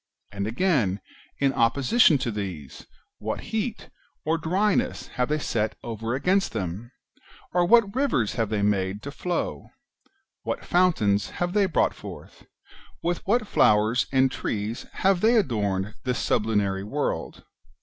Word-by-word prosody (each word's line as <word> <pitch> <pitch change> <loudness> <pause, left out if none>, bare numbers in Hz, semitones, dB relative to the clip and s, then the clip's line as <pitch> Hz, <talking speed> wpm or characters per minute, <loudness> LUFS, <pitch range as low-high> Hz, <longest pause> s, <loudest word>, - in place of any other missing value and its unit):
And 100 0 -3
again, 115 - +1 0.4
in 140 -1 +2
opposition 140 - +4
to 120 - -1
these, 90 -10 -6 0.3
what - - -3
heat 220 +1 -3 0.3
or 160 +2 +1
dryness 190 +6 0
have 125 0 -1
they 150 - +1
set 110 -7 -1
over 115 +1 -3
against 190 +8 +1
them? 105 +3 -4 0.6
or, 175 0 +3
what 225 -2 +5
rivers 250 - +1
have 115 -3 -1
they 105 -2 0
made 100 0 0
to 140 - -5
flow? 175 +4 -3 0.7
what - - -4
fountains 130 - +2
have 175 0 -1
they 205 -2 +3
brought 180 - +1
forth? - - -11 0.6
wdth 175 0 0
what 230 +2 +2
flowers 110 - +3
and 130 -1 +3
trees 110 0 -4
have 190 -2 +1
they 230 +2 +4
adorned 105 - 0
this 125 -1 -1
sublunary 100 -3 0
world 140 +8 -3
125 Hz, 140 wpm, -25 LUFS, -, 0.7 s, what